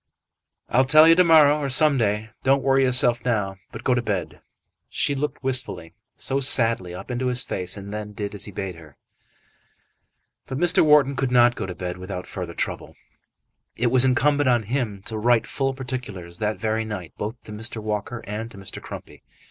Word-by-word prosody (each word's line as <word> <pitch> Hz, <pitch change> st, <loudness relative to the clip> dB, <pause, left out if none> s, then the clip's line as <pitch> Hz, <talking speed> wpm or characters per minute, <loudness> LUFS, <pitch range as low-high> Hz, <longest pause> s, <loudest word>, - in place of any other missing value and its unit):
"I'll 130 Hz, -, +3 dB
tell 155 Hz, +4 st, +7 dB
you 165 Hz, -, +8 dB
to 180 Hz, +2 st, +5 dB
morrow, 155 Hz, -3 st, +5 dB
or 140 Hz, -2 st, -2 dB
some 140 Hz, +1 st, +5 dB
day. 105 Hz, 0 st, -1 dB
Don't 135 Hz, 0 st, +2 dB
worry 135 Hz, 0 st, +3 dB
yourself 125 Hz, -2 st, +4 dB
now, 105 Hz, -6 st, -1 dB
but -, -, -9 dB
go 130 Hz, -, +2 dB
to 120 Hz, -, +1 dB
bed." 100 Hz, -6 st, -4 dB, 0.5 s
She 145 Hz, -, 0 dB
looked 140 Hz, 0 st, -4 dB
wistfully, 130 Hz, -10 st, -1 dB, 0.2 s
so 135 Hz, +1 st, -1 dB
sadly, 115 Hz, -9 st, +1 dB
up 90 Hz, -, -8 dB
into 125 Hz, +1 st, -2 dB
his 125 Hz, 0 st, +2 dB
face, 90 Hz, +2 st, -3 dB
and 100 Hz, +1 st, -8 dB
then 105 Hz, 0 st, -6 dB
did 105 Hz, 0 st, -5 dB
as 105 Hz, -, -2 dB
he 105 Hz, -, -9 dB
bade 95 Hz, -1 st, -5 dB
her. 75 Hz, -4 st, -16 dB, 1.5 s
But 130 Hz, -, -4 dB
Mr. 175 Hz, +3 st, +3 dB
Wharton 150 Hz, -3 st, +4 dB
could 135 Hz, 0 st, -1 dB
not 120 Hz, -1 st, +5 dB
go 95 Hz, -, -5 dB
to 90 Hz, -, -6 dB
bed 90 Hz, -1 st, -5 dB
without 90 Hz, 0 st, -6 dB
further -, -, -7 dB
trouble. -, -, -4 dB, 0.8 s
It 120 Hz, 0 st, 0 dB
was 130 Hz, 0 st, +5 dB
incumbent 145 Hz, +2 st, +2 dB
on 120 Hz, -2 st, +2 dB
him 110 Hz, -4 st, -3 dB
to 110 Hz, 0 st, -4 dB
write 120 Hz, +1 st, +3 dB
full 135 Hz, -1 st, -2 dB
particulars 110 Hz, -10 st, -6 dB
that 105 Hz, -1 st, -1 dB
very 110 Hz, +2 st, -1 dB
night 105 Hz, -7 st, -7 dB
both 105 Hz, +3 st, -5 dB
to -, -, -11 dB
Mr. 110 Hz, +3 st, -5 dB
Walker 110 Hz, +2 st, -4 dB
and 110 Hz, +2 st, -5 dB
to 110 Hz, -, -14 dB
Mr. 95 Hz, -1 st, -9 dB
Crumpy. -, -, -10 dB
120 Hz, 195 wpm, -23 LUFS, 105-135 Hz, 1.5 s, you